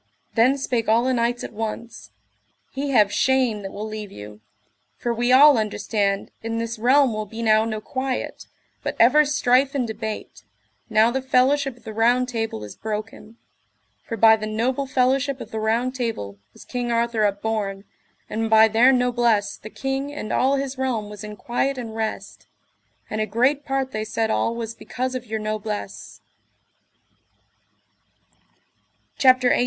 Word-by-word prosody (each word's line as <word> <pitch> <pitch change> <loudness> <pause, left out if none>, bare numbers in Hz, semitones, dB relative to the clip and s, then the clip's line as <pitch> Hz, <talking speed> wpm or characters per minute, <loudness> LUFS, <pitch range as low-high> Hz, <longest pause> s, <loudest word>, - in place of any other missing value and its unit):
Then 250 +4 +4
spake 240 -5 -1
all 230 +2 +4
the 260 +1 +1
knights 240 0 0
at - - -7
once: 220 - -6 0.6
He 280 +1 -3
have 210 -6 +4
shame 255 -5 +2
that 195 -1 -7
will 215 +2 -5
leave 215 -2 -7
you; 105 +1 -11 0.6
for 240 - -2
we 240 +2 0
all 275 0 +7
understand 205 -2 -1
in 225 0 -3
this 230 0 -4
realm 260 +1 +4
will 215 0 -4
be 225 +3 -6
now 220 0 +4
no 220 -1 -3
quiet, 260 +2 -4 0.3
but - - -3
ever 280 +6 +6
strife 275 -1 +2
and 260 -3 +1
debate, 220 -1 -6 0.5
now 220 +2 +4
the 265 +2 -1
fellowship 265 0 +2
of - - -22
the 220 - -7
Round 240 +3 +2
Table 225 - -3
is 105 - -9
broken; 215 +1 -6 0.7
for 230 - -5
by 220 +1 +7
the 215 -1 -5
noble 250 +6 -1
fellowship 265 +1 +1
of - - -9
the 220 - -3
Round 230 +4 0
Table 225 - -4
was - - -15
King 245 -1 -3
Arthur 235 -1 +1
upborne, 200 -1 -1 0.4
and 225 +1 -2
by 220 0 +7
their 230 +4 +5
noblesse 240 -4 +1
the 215 - -10
king 270 +3 -3
and 290 -7 -5
all 265 +2 +2
his 275 -1 -3
realm 230 -6 -2
was 210 0 -9
in 210 0 -7
quiet 260 +5 -2
and 225 -3 -6
rest, 220 -1 -5 0.6
and 215 - -3
a 215 - -1
great 255 +7 +1
part 270 -2 -2
they 215 -2 -3
said 220 0 -1
all 230 - 0
was 230 -1 -5
because 255 +2 -4
of 255 -1 -5
your 220 +1 -2
noblesse. 215 0 -5 3.0
CHAPTER 255 -2 +5
XVIII. - - +3
230 Hz, 165 wpm, -23 LUFS, 215-255 Hz, 3.0 s, all